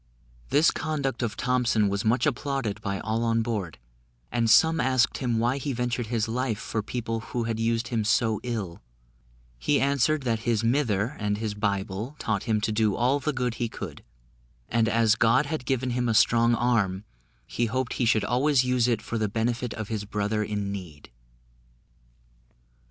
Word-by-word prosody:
This 145 +5 +4
conduct 140 -6 -2
of 110 -3 -2
Thompson 125 -4 +2
was 100 +1 -1
much 120 +3 +2
applauded 135 -6 -2
by 100 -3 -3
all 110 +1 -1
on 115 0 +1
board, 105 -8 -3 0.5
and 115 -1 +1
some 160 +8 +5
asked 130 -1 +2
him 120 -3 0
why 120 +4 +1
he 140 +1 -3
ventured 120 -1 -2
his 115 -1 -1
life 120 -1 -1
for 110 0 -3
people 115 +1 -3
who 115 +1 -4
had 115 -1 -2
used 115 +1 0
him 115 -3 0
so 110 0 +2
ill: 110 -8 -4 0.8
he 145 - +2
answered, 140 +2 +2
that 115 -3 0
his 115 -1 0
mither 115 -1 +1
and 105 -1 -1
his 110 -1 -3
Bible 100 +4 -2
taught 105 -6 -2
him 110 -3 +1
to 110 +1 0
do 105 -2 +1
all 130 +4 +2
the 150 +2 -1
good 125 -3 -1
he 120 - 0
could: - - -8 0.7
and 115 -1 +2
as 115 -1 +3
God 120 +6 +3
had 145 -3 -4
given 130 -1 0
him 120 0 0
a 110 - +1
strong 115 +2 +4
arm, 110 -5 +1 0.4
he 120 - -1
hoped 130 +2 -2
he 125 - 0
should 110 -2 +2
always 130 +3 +3
use 125 -1 +2
it 115 -3 0
for 115 - -3
the 105 -1 0
benefit 115 +2 -1
of 110 -2 -5
his 110 -2 -2
brother 105 +1 -1
in 105 -1 -3
need. 85 -10 -8
115 Hz, 180 wpm, -26 LUFS, 110-125 Hz, 0.8 s, some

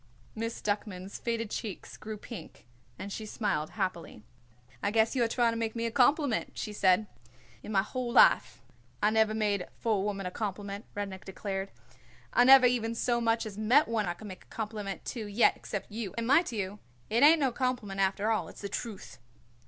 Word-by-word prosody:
Miss 230 +1 -4
Duckman's 205 -2 -3
faded 230 -2 -2
cheeks 205 -5 -5
grew 215 0 -7
pink 205 - -10 0.3
and 200 0 -6
she 220 - -5
smiled 200 -9 -1
happily. 175 - -3 0.6
"I - - +1
guess 220 +3 +2
you 250 - +3
are - - +2
trying 235 0 +2
to - - -3
make 225 0 -2
me 230 0 -2
a 230 - -1
compliment," 280 0 +2
she 210 - -4
said. 190 0 +3 0.6
"In - - -8
my 195 -2 +3
whole 250 +2 -4
life 245 - +5 0.4
I 210 - +5
never 220 0 +3
made 205 -4 0
for 225 -3 +1
a - - 0
woman 200 -1 -2
a 180 - -3
compliment," 200 0 -4
Rudnik 195 -2 -5
declared. 195 0 -4 0.6
"I 245 - +5
never 265 0 +9
even 230 -2 +1
so 235 0 +1
much 230 0 +1
as 210 -1 -7
met 245 +8 +4
one 220 -4 0
I 175 - -2
could 215 - -12
make 185 -2 -10
a - - -31
compliment 210 -3 -5
to 225 -4 -4
yet 205 +4 +4
except 205 +1 -6
you, 215 -3 -5
and 230 - -1
mit 280 +5 +4
you 205 -2 -4 0.3
it 230 +2 +3
ain't 310 +3 +8
no 270 -3 +2
compliment, 240 -6 -2
after 195 +3 +1
all. 220 - 0
It's - - -12
the 200 - -4
truth." 200 - -6
215 Hz, 200 wpm, -30 LUFS, 200-230 Hz, 0.6 s, never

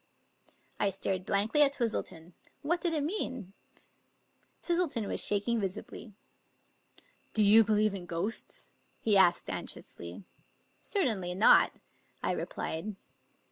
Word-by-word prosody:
I 205 - +2
stared 190 -1 -1
blankly 210 +9 +2
at 280 -1 +6
Twistleton. 185 - -4 0.3
What 345 +4 0
did 345 - +1
it 305 -3 0
mean? 260 - -2 1.1
Twistleton 335 - 0
was - - +2
shaking 210 +3 +2
visibly. 200 +2 -6 1.2
"Do 215 - +4
you 215 +2 +7
believe 215 -1 +1
in 180 -3 -7
ghosts?" 175 +7 -2 0.3
he 215 -2 +2
asked 180 -3 +4
anxiously. 85 - -6 0.3
" - - -42 0.2
Certainly 215 - -1
not," 205 - +5 0.4
I - - +1
replied. 190 +6 -4
210 Hz, 115 wpm, -30 LUFS, 190-255 Hz, 1.2 s, you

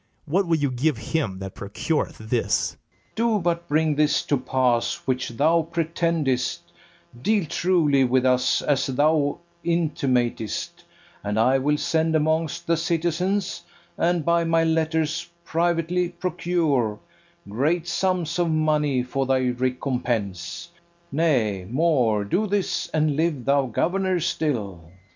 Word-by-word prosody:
What 180 +5 +1
will 165 -1 +2
you 145 -3 0
give 130 +2 0
him 110 -3 -2
that 95 0 -7
procureth 145 +10 -2
this? 110 +2 0
FERNEZE. - - -22 0.4
Do 230 -1 +1
but 170 -2 -1
bring 155 0 +2
this 150 0 +2
to 145 - +1
pass 125 -2 +1
which 130 0 -1
thou 155 +8 +2
pretendest, 165 -5 0 0.6
Deal 210 +2 +2
truly 155 -5 +2
with 130 0 +2
us 125 0 +2
as 145 -2 +1
thou 145 +2 +2 0.3
intimatest, 135 - -1 0.4
And 105 +1 -1
I 130 +4 +4
will 150 +3 +1
send 160 +1 +1
amongst 160 +1 0
the 165 -1 +2
citizens, 175 +4 -1 0.3
And 170 -2 +1
by 170 0 +3
my 165 0 +2
letters 160 0 0 0.2
privately 170 +1 0
procure 170 - -1 0.5
Great 155 - 0
sums 180 -2 0
of 175 -1 +2
money 150 -4 +1
for 135 +1 -2
thy 130 -1 +2
recompense: 125 - -2 0.4
Nay, 125 - +1
more, 125 -7 +2
do 200 - 0
this, 190 -4 -1
and 155 -3 0
live 155 -5 0
thou 140 0 +2
governor 185 - 0
still. 125 - -2
155 Hz, 130 wpm, -24 LUFS, 130-170 Hz, 0.6 s, I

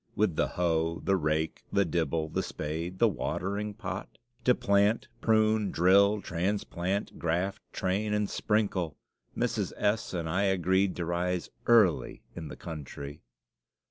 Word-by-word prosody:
With 100 -6 +2
the - - +2
hoe, 85 -1 0
the 95 - +3
rake, 80 -2 -1
the 100 - +3
dibble, 80 -1 -1
the - - -1
spade, 80 +4 -4
the 115 - +5
watering 100 +3 -2
pot? 95 +1 -6 0.3
To 125 - +5
plant, 100 +2 +2
prune, 110 -2 +3
drill, 100 +4 +4
transplant, 95 +1 -2
graft, 90 +5 -1
train, 100 +3 -1
and 105 0 +1
sprinkle! 100 -8 0 0.4
Mrs. - - -1
S. 105 +2 0
and 85 -2 -2
I 95 +5 +1
agreed 95 0 +2
to 85 - -3
rise 90 0 -1 0.2
early 110 -9 +4
in 80 -2 -6
the - - -9
country. 75 -2 -7
95 Hz, 140 wpm, -29 LUFS, 85-100 Hz, 0.4 s, the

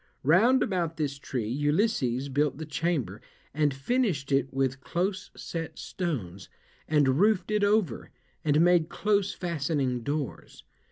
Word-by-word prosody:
Round 215 - +5
about 175 -4 -1
this 140 -3 -2
tree 125 -6 -3
Ulysses 140 - +1
built 140 0 0
the 160 - -5
chamber, 155 -2 -2 0.3
and 150 0 +2
finished 145 - -1
it 135 -1 +2
with 135 0 -1
close 185 +4 -2
set 165 -1 -5
stones, 100 - -4 0.4
and 145 -3 +3
roofed 205 -2 +3
it 210 -1 +2
over, 205 - +1 0.3
and 150 0 +3
made 175 -2 +4
close 200 +1 +1
fastening 145 -7 -1
doors. 145 +2 -5
150 Hz, 130 wpm, -28 LUFS, 135-180 Hz, 0.4 s, Round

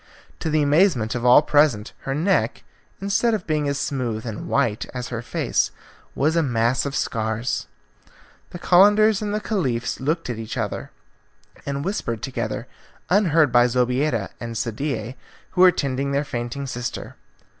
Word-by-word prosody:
To 160 - -2
the 155 -1 +2
amazement 145 - +3
of 125 - -3
all 125 +4 +7
present, 145 -8 +2
her 135 - 0
neck, 180 +7 +1 0.4
instead 210 +4 +1
of 195 - -5
being 150 -2 0
as 140 - -1
smooth 125 -6 -2
and 110 -3 -6
white 120 -7 0
as 125 0 -4
her 120 -2 -4
face, - - 0 0.5
was 155 +4 +1
a 165 - +4
mass 120 -1 +1
of 140 - -4
scars. 110 +2 -2 0.8
The - - -8
Calenders 205 +4 +5
and 210 -1 -2
the 210 - 0
Caliph 135 - -2
looked 155 +5 -1
at 120 -3 -4
each 110 +2 -6
other, 110 -4 -3 0.8
and 140 0 -3
whispered 115 - -3
together, 135 -1 -3 0.5
unheard 165 - +4
by 120 0 +5
Zobeida 125 -1 0
and 115 -1 -5
Sadie, 120 +1 -3 0.3
who 180 - +1
were 185 -1 +9
tending 140 -2 -2
their 140 +1 0
fainting 120 +2 -4
sister. 125 -2 -5
135 Hz, 155 wpm, -23 LUFS, 120-160 Hz, 0.8 s, were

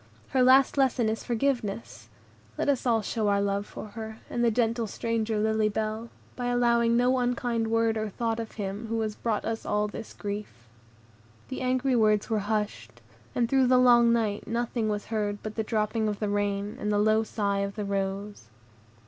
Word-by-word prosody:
Her 260 - +2
last 260 +2 +5
lesson 255 -4 +2
is 220 - -3
forgiveness; 205 - -2 0.5
let - - 0
us 270 -2 +1 0.2
show 220 -2 -1
our 200 0 +3
love 200 0 -1
for 215 - -8
her, 220 0 -7
and 240 - 0
the 235 - +5
gentle 230 0 0
stranger 225 +1 -1
Lily 220 0 +2
Bell, 220 +2 -3 0.3
by 245 -1 -3
allowing 235 -1 +3
no 250 +1 +3
unkind 245 -2 0
word 225 0 +1
or 215 0 -2
thought 225 +2 -2
of 225 -1 -6
him 205 +1 -4
who 225 0 -1
has 215 -1 -2
brought 220 0 -2
us 225 0 -3
all 210 0 0
this 210 - -8
grief." 200 - -6 0.8
The 260 - -5
angry 255 +1 +1
words 215 -1 +2
were 220 - +2
hushed, 200 - -3 0.4
and 240 -1 +2
through 265 0 +3
the 255 0 +5
long 240 -2 +6
night 220 -3 0
nothing 235 -1 -1
was 210 0 -2
heard 205 -1 -1
but 215 - -5
the 220 - -1
dropping 215 0 0
of 210 -1 -2
the 210 - -1
rain, 205 0 -1
and 210 - -1
the 205 - +2
low 215 +1 +3
sighs 200 -2 -1
of 200 - -9
the 210 -1 -3
rose. 195 - -3
220 Hz, 190 wpm, -27 LUFS, 205-235 Hz, 0.8 s, long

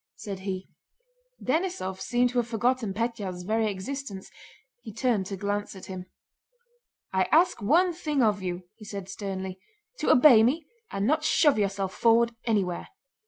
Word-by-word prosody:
said 200 -3 -6
he. 190 -1 -4 0.8
Denísov 260 - -1
seemed 245 0 +1
to 245 - +1
have 235 - -1
forgotten 235 -1 0
Pétya's 205 -4 -3
very 220 +3 +1
existence. 200 +1 -6 0.5
He 225 - -8
turned 220 -3 0
to 195 - -5
glance 205 +1 -2
at 190 - -10
him. 185 -1 -7 1.1
"I 190 0 +3
ask 330 -5 +4
one 345 - +3
thing 300 -5 0
of 210 -3 +2
you," 180 -1 -4
he 220 - -13
said 200 -3 -6
sternly, 190 -1 -5 0.4
"to - - 0
obey 250 -4 +8
me 285 +8 +2 0.2
and 195 0 -2
not 305 +5 +2
shove 295 -5 +4
yourself 195 -1 -1
forward 235 0 +3
anywhere." 195 -6 0
215 Hz, 155 wpm, -27 LUFS, 190-250 Hz, 1.1 s, obey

